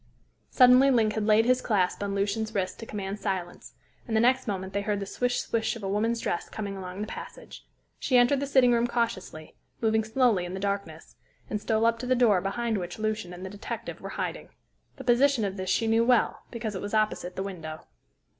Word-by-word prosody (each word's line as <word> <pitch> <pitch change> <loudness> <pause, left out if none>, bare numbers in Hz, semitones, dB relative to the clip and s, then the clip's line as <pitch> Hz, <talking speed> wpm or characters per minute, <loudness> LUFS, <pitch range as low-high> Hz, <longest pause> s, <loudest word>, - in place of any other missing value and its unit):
Suddenly 255 +1 +6
Link 225 -5 +3
had 215 -1 -2
laid 220 +1 +5
his 255 +1 +3
clasp 195 -5 0
on 200 -1 -2
Lucian's 215 +2 -1
wrist 185 -2 -2
to 225 - -8
command 200 0 -5
silence, 190 -4 -4 0.3
and 225 - -2
the - - +4
next 255 +2 +3
moment 190 -2 -3
they 200 - 0
heard 205 0 -1
the 200 - -4
swish 245 +5 -1
swish 225 0 -1
of 225 - -9
a - - -2
woman's 225 +4 0
dress 170 - -2
coming 200 -2 -5
along 185 +1 -7
the - - -1
passage. - - -10 0.3
She 255 - +2
entered 245 +3 +4
the 280 - -2
sitting 260 -3 +5
room 235 0 +2
cautiously, 230 -10 -3 0.3
moving 220 -1 +2
slowly 220 -4 +2
in 175 +1 -5
the - - -4
darkness, 200 -5 -4 0.3
and 210 - -2
stole 220 0 +1
up 230 0 +2
to 250 - -5
the 255 - +3
door 220 -7 +4
behind 220 +2 -1
which 175 -1 -6
Lucian 215 -4 -2
and 180 +1 -8
the - - -5
detective 205 - -6
were - - -6
hiding. - - -4 0.5
The 265 - -9
position 250 -1 +3
of 195 -1 -3
this 185 -1 -4
she 195 +4 +2
knew 225 +1 +3
well, 245 -1 +2
because 230 -3 -4
it 190 - -5
was 205 +2 -3
opposite 210 -4 0
the 190 - -2
window. 160 -5 -7
215 Hz, 220 wpm, -27 LUFS, 195-235 Hz, 0.5 s, Suddenly